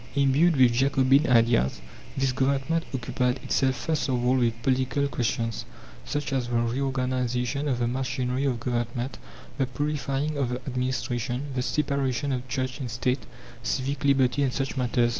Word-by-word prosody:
Imbued 140 +5 +4
with 125 -2 +6
Jacobin 135 +3 +3
ideas, 115 - +3 0.4
this 135 -1 +2
Government 135 +5 +1
occupied 125 0 -1
itself 130 -1 +1
first 150 +3 -1
of 125 -1 0
all 125 +1 +4
with 115 -2 +1
political 130 +2 +1
questions, 115 -3 -1 0.4
such 145 - -2
as 130 -3 0
the 120 - -2
reorganization 125 +2 0
of 130 -4 +1
the 120 -1 0
machinery 125 +1 -1
of 125 -4 0
government, 120 +1 -2 0.4
the 135 - +2
purifying 145 +2 -2
of 130 -3 +1
the 125 - -1
administration, 125 0 -2
the 130 - -1
separation 140 -1 0
of 130 0 -3
Church 130 +1 -2
and 130 -3 -4
State, 125 +3 -1 0.3
civic 135 +3 -2
liberty, 140 0 +3
and 135 -2 +2
such 135 +1 -2
matters. 120 -2 +2
130 Hz, 155 wpm, -26 LUFS, 125-140 Hz, 0.4 s, with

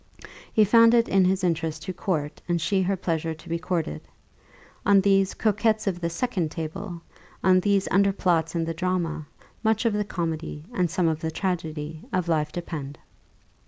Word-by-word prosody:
He 215 - +5
found 230 +2 +6
it 230 -1 +4
his 190 0 +2
interest 160 -2 -1
to 185 - -4
court, 165 -5 -2
and 170 0 +2
she 190 +4 +1
her 190 +1 0
pleasure 165 -2 -2
to 160 - -16
be 170 0 -2
courted. 165 - -2 0.8
On 200 -1 +5
these 195 -1 +3
"coquettes 215 0 +1
of 185 -3 -1
the 170 - 0
second 180 -3 -1
table," 165 +2 -6 0.4
on 185 -1 +5
these 200 0 +1
underplots 180 -4 +2
in 165 -1 0
the 165 - -2
drama, 165 -3 -2 0.4
much 220 +1 +2
of 230 - +3
the 210 0 +1
comedy, 165 -5 -4
and 180 -5 +1
some 180 0 +1
of 160 -1 0
the 160 - -2
tragedy, 160 -3 -3
of 185 -2 0
life 155 -2 +1
depend. 150 -5 -6
175 Hz, 170 wpm, -25 LUFS, 160-195 Hz, 0.8 s, found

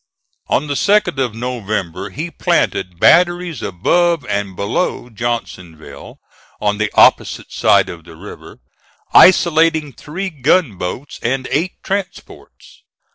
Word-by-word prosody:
On 140 - 0
the 145 - -3
2d 200 -2 +1
of 120 -4 -4
November 105 -6 -4
he 155 - -6
planted 95 - -1
batteries 175 - +3
above 165 - 0
and 100 -4 -3
below 115 - -2
Johnsonville, 100 -8 -6 0.4
on 105 0 -1
the 110 -1 -1
opposite - - +3
side - - +3
of 85 -2 -10
the 80 - -13
river, 95 +6 -12 0.6
isolating 160 -4 +4
three 180 +9 -6
gunboats 135 - -1
and 130 +2 -2
eight 170 +5 0
transports. 195 0 -7
125 Hz, 115 wpm, -17 LUFS, 100-170 Hz, 0.6 s, isolating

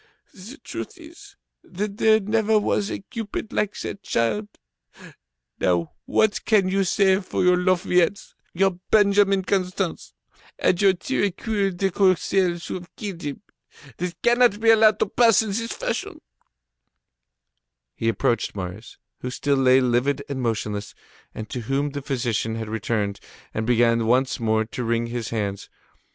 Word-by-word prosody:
The 215 +9 -11
truth - - -7
is, 345 +5 -14 0.3
that 200 +2 -5
there 220 -1 +5
never 220 +1 +1
was 205 -1 0
a - - -5
cupid 220 0 -6
like 210 -1 -1
that 200 - -6
child. 110 -3 -1 1.1
Now, 85 -3 +1
what 215 -2 +1
can 205 -4 +3
you 195 +1 +1
say 190 +1 +3
for 185 - -2
your 180 0 +5
Lafayettes, 180 +1 +1 0.2
your 190 0 +1
Benjamin 200 -2 +4
Constants, 185 -2 -2 0.4
and 175 - +1
your 195 -2 +5
Tirecuir 200 -1 -1
de 195 +1 0
Corcelles 185 -1 +1
who - - -5
have 180 -2 -8
killed 195 -5 -6
him? 145 +8 -6 0.5
This 175 0 -4
cannot 240 -3 +4
be 225 0 +5
allowed 215 -1 +5
to - - +4
pass 225 +1 +4
in 220 - -5
this 230 +3 -3
fashion." - - -4 1.7
He 115 - -1
approached 115 +1 0
Marius, 95 +3 -7 0.2
who 125 - -4
still 140 +2 0
lay 130 0 +5
livid 130 +3 +1
and 140 -3 -4
motionless, 105 -3 -3 0.4
and 110 - -6
to 125 - -3
whom 135 +5 -1
the 145 0 -5
physician 120 -5 -2
had 110 -1 -5
returned, 105 -2 -2 0.3
and 110 +1 -3
began 115 -1 +3
once 130 +3 +2
more 110 -1 +1
to 125 +3 -5
wring 115 0 0
his 115 -1 -4
hands. 100 -3 -3
180 Hz, 150 wpm, -23 LUFS, -, 1.7 s, there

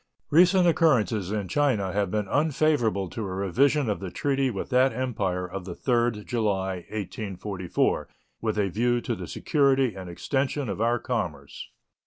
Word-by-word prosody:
Recent 180 +3 +5
occurrences 120 - +2
in 105 -3 -2
China 110 -5 +1
have 100 -2 0
been 105 0 -1
unfavorable 145 -8 +1
to 115 - -5
a 95 -3 -4
revision 130 - +2
of 105 - -1
the 95 - -5
treaty 135 +5 0
with 110 +3 -5
that 130 +1 +4
Empire 105 -8 -2
of 90 0 -7
the 90 -2 -6
3d 120 -4 0
July, 95 -5 -1
1844, 100 -3 -2 0.3
with 110 -2 -1
a 100 -2 +1
view 120 +6 +1
to - - -3
the - - -6
security 135 -4 +2
and 95 -2 -8
extension 135 +7 -2
of - - -3
our 120 +1 +2
commerce. - - -4
110 Hz, 160 wpm, -26 LUFS, 100-135 Hz, 0.3 s, Recent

